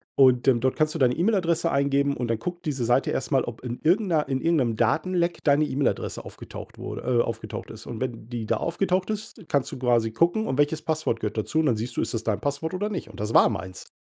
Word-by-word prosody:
und, 130 -1 +5
ähm, 120 -3 +5
dort 130 +2 +1
kannst 155 -1 +1
du 165 - -4
deine 125 -1 +3
E-Mail-Adresse 170 -3 +1
eingeben 140 0 +2
und 120 -1 -2
dann 115 -1 0
guckt 175 +5 -5
diese 135 -5 -1
Seite 120 +3 +2
erst - - -2
mal, 135 -2 +3
ob 120 -1 -7
in 120 -1 -5
irgend 185 +5 +3
'ner 155 -4 +2
in 130 -1 -1
irgend 165 -1 +2
'nem 120 -5 +1
Datenleck 170 +9 +1
deine 145 0 +4
E-Mail-Adresse 140 -1 -1
aufgetaucht - - -10
wurde - - -6
äh, 120 -1 +3
aufgetaucht - - -5
ist. - - -11
Und 115 0 -6
wenn 120 -3 -4
die 120 -3 -4
da - - +1
aufgetaucht 185 +3 0
ist, 215 0 -5
kannst 140 -2 0
du - - -7
quasi 120 -3 +2
gucken, 175 - +2
und 130 - -2
welches 150 +2 +2
Passwort 155 -8 -1
gehört 105 0 -3
dazu? 155 +9 0
Und 155 - +3
dann 115 -4 +2
siehst 115 +3 -4
du, - - +2
ist - - -2
das 115 -1 -2
dein 105 -2 -1
Passwort 145 +6 -2
oder 205 +3 -1
nicht? 190 - -5
Und 100 - -12
das 105 +2 -2
war - - +7
meins. 95 -3 -6
140 Hz, 250 wpm, -25 LUFS, 120-165 Hz, -, war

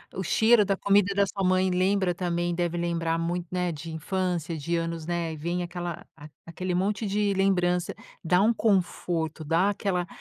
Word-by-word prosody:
o 190 - -3
cheiro 220 +5 +4
da 195 -1 0
comida 200 0 +3
da 200 0 +3
sua 195 +2 -4
mãe 185 0 +3
lembra 185 0 +1
também 175 -1 -1
deve 175 -1 -1
lembrar 170 -1 -1
muito, 175 +1 -2
né, 180 -2 -1
de 160 +2 -7
infância, 170 0 -2
de 170 +3 -1
anos, 165 -1 -3
né, 170 -1 -2
e - - -6
vem 175 +3 -2
aquela 175 -1 -5
a 150 0 -12 0.2
aquele 180 +2 -4
monte 200 +4 0
de 205 +1 +1
lembrança, 180 -2 +1 0.3
dá 180 +2 +3
um 220 +3 +4
conforto, 175 -6 0
dá 170 +6 +2
aquela 190 -3 -1
180 Hz, 180 wpm, -26 LUFS, 170-190 Hz, 0.3 s, cheiro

